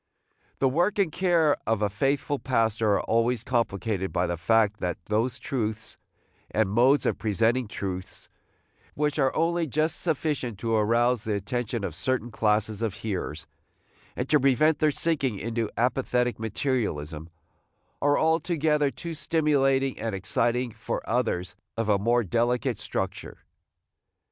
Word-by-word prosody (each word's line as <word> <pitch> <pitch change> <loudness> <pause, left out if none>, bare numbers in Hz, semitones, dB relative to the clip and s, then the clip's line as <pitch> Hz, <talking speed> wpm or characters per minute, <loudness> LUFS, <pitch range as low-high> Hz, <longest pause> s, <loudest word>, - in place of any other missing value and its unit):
The 135 - +2
work 175 +11 +1
and 195 -6 +2
care 170 -4 +2
of 110 -1 +1
a - - +3
faithful 135 +6 -1
pastor 115 -4 +1
are - - +2
always 115 0 +1
complicated 110 -5 -1
by 90 - +1
the 85 0 -1
fact 105 +4 +2
that 90 -1 -2
those 115 +4 0
truths, 110 -4 -3 0.5
and 105 -3 +1
modes 130 +6 +4
of - - 0
presenting 115 +3 +1
truths, 95 -2 -6 0.7
which 150 0 0
are 135 -2 +3
only 170 0 +1
just 155 +4 0
sufficient 145 - -1
to 115 +3 -2
arouse 115 +2 +2
the 110 - -1
attention 115 +2 -2
of 90 - -3
certain 120 - -2
classes 105 0 0
of 110 -4 -1
hearers, 95 -8 -4 0.7
and 125 - -3
to 150 - +5
prevent 140 +4 +3
their 155 - +4
sinking 140 -7 0
into 115 +1 -2
apathetic 125 -1 +1
materialism, 100 - -2 0.7
are 145 0 +3
altogether 160 -2 +2
too 170 +4 -6
stimulating 140 -4 +1
and 110 -3 -2
exciting 120 +5 0
for - - -5
others 90 +1 -1 0.2
of 115 -1 -1
a 100 -1 +3
more 120 +3 +2
delicate 120 +4 0
structure. - - -4
120 Hz, 140 wpm, -26 LUFS, 105-140 Hz, 0.7 s, to